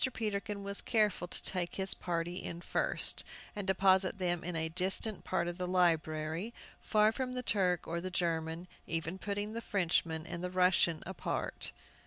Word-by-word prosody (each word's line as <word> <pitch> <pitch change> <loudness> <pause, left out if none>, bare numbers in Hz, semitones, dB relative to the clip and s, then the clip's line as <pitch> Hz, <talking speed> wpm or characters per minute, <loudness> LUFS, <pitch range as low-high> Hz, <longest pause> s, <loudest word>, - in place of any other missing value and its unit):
Peterkin 210 -1 -2
was 200 0 -1
careful 210 -6 +2
to - - -3
take 175 -2 -2
his 190 0 +1
party 175 0 -2
in 170 -2 -5
first, 175 - 0 0.3
and 205 -2 -4
deposit 190 0 +4
them 175 -2 0
in 180 0 -3
a 160 0 0
distant 190 +5 +1
part 175 -2 0
of 175 +1 -4
the 180 - -1
library, 165 +2 +1 0.3
far 215 0 +4
from 255 +1 -3
the 250 - -2
Turk 180 -6 +1
or 170 +1 -2
the 185 - -3
German, 165 -1 -1 0.2
even 165 +3 -2
putting 205 +2 -2
the 230 - -3
Frenchman 165 -6 +1
and 180 +2 -5
Russian 180 -3 +4
apart. 190 0 -2
180 Hz, 165 wpm, -33 LUFS, 170-200 Hz, 0.3 s, deposit